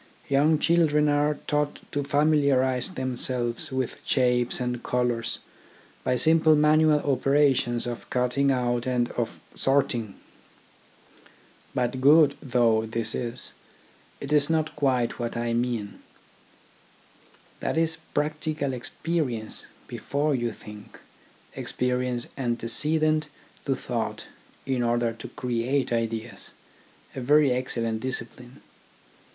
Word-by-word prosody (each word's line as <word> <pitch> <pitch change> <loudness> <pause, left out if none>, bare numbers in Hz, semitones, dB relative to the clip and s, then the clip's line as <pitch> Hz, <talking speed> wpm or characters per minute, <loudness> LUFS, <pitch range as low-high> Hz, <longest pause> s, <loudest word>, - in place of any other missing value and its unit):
Young 145 +3 +4
children 155 -2 +3
are 145 +1 +2
taught 150 -1 -1
to 145 - -1
familiarise 140 -3 +2
themselves 125 -5 -1
with 130 -2 -3
shapes 125 -2 +1
and 125 -1 -2
colours 120 -2 -1 0.7
by 125 - +1
simple 155 +4 +5
manual 150 0 +4
operations 135 -3 +2
of 120 -1 -6
cutting 125 +3 +1
out 120 -2 0
and 125 -1 +1
of 115 -2 -3
sorting. 120 -6 0 1.6
But 125 +1 -1
good 145 +1 +6
though 115 -4 +2
this 115 0 -1
is, 120 +1 -2 0.7
it 140 +1 -4
is 145 0 +4
not 160 -1 0
quite 130 -5 0
what 120 0 -3
I 120 0 -1
mean. 115 -4 -2 1.6
That - - -2
is 165 0 +1 0.2
practical 150 -2 -1
experience 125 -3 -3 0.2
before 145 +2 -1
you 120 -3 -1
think, 105 -1 -12 0.6
experience 125 -1 -1
ante 120 -3 -2
cedent 155 +5 +2 0.4
to 135 - +1
thought 115 -3 -4 0.4
in 130 -2 0
order 120 -1 +1
to 115 - -9
create 125 +2 -1
ideas, 115 0 -3 0.7
a 130 - -4
very 145 +2 +4
excellent 115 -3 -1
discipline. 125 0 -7
130 Hz, 110 wpm, -26 LUFS, 120-145 Hz, 1.6 s, good